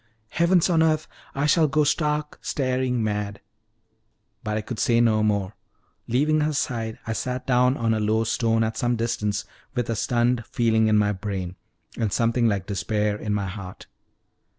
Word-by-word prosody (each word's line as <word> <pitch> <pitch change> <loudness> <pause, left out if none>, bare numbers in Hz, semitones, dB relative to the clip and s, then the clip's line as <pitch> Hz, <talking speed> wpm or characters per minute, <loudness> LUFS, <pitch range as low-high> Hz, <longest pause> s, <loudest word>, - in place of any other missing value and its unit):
"Heavens 170 +3 +3
on 165 -3 +3
earth 155 -1 +2 0.3
I 140 +1 0
shall 155 +1 +4
go 150 +2 +2
stark, 150 0 0
staring 130 -3 -1
mad!" 105 -1 -2 1.0
But 105 -2 -2
I - - -1
could 110 +2 -6
say 120 -3 +3
no 110 -2 +3
more; 100 -2 0 0.5
leaving 150 +6 +2
her 150 +1 0
side 115 -6 -2
I 115 - -2
sat 125 +2 -3
down 125 +1 +3
on 115 -1 +1
a 110 - 0
low 110 +1 +1
stone 115 0 +1
at 110 0 -2
some 120 0 +1
distance, 110 -3 -1 0.3
with 120 -2 -1
a - - -1
stunned 120 +1 +1
feeling 110 -2 +2
in 110 -1 +4
my 105 0 +3
brain, 95 -2 -4 0.4
and 110 -3 0
something 115 +2 +2
like 100 -4 0
despair 105 +1 -1
in 105 0 -2
my 100 -1 -1
heart. 95 -1 -8
115 Hz, 175 wpm, -24 LUFS, 105-130 Hz, 1.0 s, shall